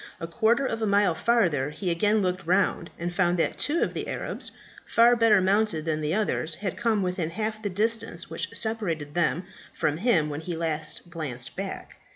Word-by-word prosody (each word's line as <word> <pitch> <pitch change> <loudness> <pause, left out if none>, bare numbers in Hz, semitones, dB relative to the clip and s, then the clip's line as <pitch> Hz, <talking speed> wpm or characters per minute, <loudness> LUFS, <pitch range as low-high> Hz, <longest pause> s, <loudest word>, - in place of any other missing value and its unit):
A - - -4
quarter 230 +9 +2
of 225 -3 -2
a 220 - +1
mile 200 -3 +3
farther 165 - +2
he 180 +4 -3
again 205 +5 +2
looked 185 -1 -2
round, 185 -2 +2
and 175 +1 -3
found 175 -1 +2
that 165 - 0
two 315 +4 +3
of - - -2
the - - -4
Arabs, - - -3 0.3
far 235 +1 +5
better 225 -3 +5
mounted 195 -3 +1
than 155 -1 -1
the 155 +3 0
others, 180 -6 0
had 190 +1 -4
come 225 -4 +1
within 180 -3 -1
half 215 +4 -3
the 205 - -2
distance 225 +4 -1
which - - -4
separated 170 -10 -2
them 175 +1 +1 0.3
from 150 0 0
him 180 -6 +2
when 150 0 -4
he 170 +1 -4
last 160 +1 -3
glanced 140 -7 -5
back. 195 0 -6
185 Hz, 195 wpm, -26 LUFS, 165-220 Hz, 0.3 s, far